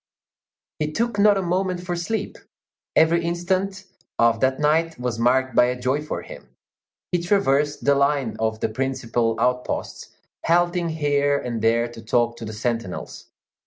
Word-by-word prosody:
He 150 0 -1
took 230 +3 -1
not 205 0 +5
a 195 - -1
moment 180 0 -1
for 175 -1 -2
sleep; 205 +5 -3 0.6
every 170 +1 +4
instant 185 +3 -1 0.3
of 115 -1 +3
that 130 +1 +1
night 160 +2 +1
was 125 -2 -3
marked 130 +2 +2
by - - +6
a 125 0 -2
joy 130 +4 0
for 150 - -5
him. - - -12 0.6
He 175 - +1
traversed 150 -6 +1
the 140 - +5
line 140 -3 +1
of 110 0 -1
the - - 0
principal 120 -2 -1
outposts, 125 +1 -2 0.3
halting 175 0 +2
here 145 -2 +1
and 120 -5 -4
there 115 +2 +2
to 120 -1 -11
talk 120 +1 +1
to 115 - -7
the 110 - -6
sentinels. 115 -3 -4
140 Hz, 160 wpm, -23 LUFS, 120-170 Hz, 0.6 s, by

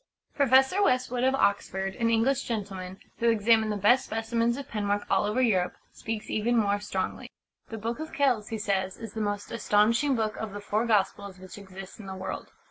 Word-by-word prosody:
Professor 270 +6 +4
Westwood, 255 -7 +1
of 265 +1 +3
Oxford 195 -4 0
an 230 +1 0
English 230 +4 +2
gentleman 195 -4 -5 0.2
who 235 - +3
examined 220 0 +3
the 210 - -2
best 245 +7 +4
specimens 230 +1 -1
of 280 - -7
penwork 205 -1 -1
all - - +3
over 220 +5 +1
Europe, 185 -7 +1 0.2
speaks 220 -1 -5
even 235 +3 +1
more 205 -2 +2
strongly. 195 -2 -4 0.4
"The 225 - -5
Book 230 +4 -4
of 315 0 -6
Kells," 255 -7 +1
he 225 - -3
says, 195 -2 -1
"is 225 -3 -8
the 220 - -3
most 205 -1 -3
astonishing 230 +5 +2
book 220 -2 -1
of 220 -2 -5
the 205 - -5
Four 210 +3 -1
Gospels 200 -2 0
which 185 +2 -11
exists 190 0 -11
in 205 - -9
the 190 - -6
world. 190 0 -5
215 Hz, 195 wpm, -27 LUFS, 200-235 Hz, 0.4 s, Professor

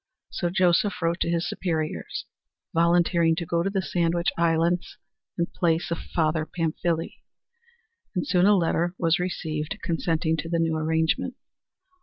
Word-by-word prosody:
So 175 - -1
Joseph 180 +2 +2
wrote 170 +1 0
to - - 0
his 170 0 0
superiors, 160 -4 -3 0.5
volunteering 170 0 +3
to 170 0 -3
go 170 +1 0
to 190 - 0
the 195 -1 -1
Sandwich 170 -1 +1
Islands 170 +1 +1 0.4
in 170 - +2
place 170 0 0
of 170 - -1
Father 155 -1 0
Pamphile, 165 +1 -2 1.0
and 180 - 0
soon 180 +1 +3
a 205 - +6
letter 170 0 0
was 165 0 +2
received 160 0 -3
consenting 165 -1 0
to 165 - -4
the 170 - +1
new 165 -1 +1
arrangement. 160 +1 0
170 Hz, 145 wpm, -25 LUFS, 165-175 Hz, 1.0 s, a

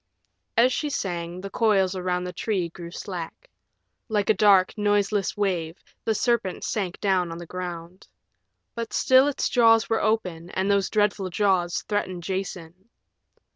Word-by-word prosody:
As 250 +2 +5
she 300 - -1
sang, 175 -8 -4
the 195 0 -7
coils 195 -4 +2
around 180 -1 -1
the 180 0 -5
tree 190 -3 -1
grew 170 0 -9
slack. 175 - -7 0.6
Like 210 -1 +2
a - - +4
dark, 195 -3 +4
noiseless 205 -1 0
wave 180 -4 -1 0.3
the 220 - +1
serpent 230 -5 0
sank 195 -7 -3
down 185 -4 +1
on 165 - -6
the 175 - -8
ground. 175 0 -7 0.7
But 230 -1 -5
still 260 +2 +5
its 290 - 0
jaws 225 -2 +4
were 225 - +2
open, 180 -6 -1
and 190 +2 +1
those 200 -2 +2
dreadful 205 -3 +1
jaws 180 -2 +1
threatened 185 -4 -3
Jason. 185 +1 -5
190 Hz, 150 wpm, -25 LUFS, 180-215 Hz, 0.7 s, As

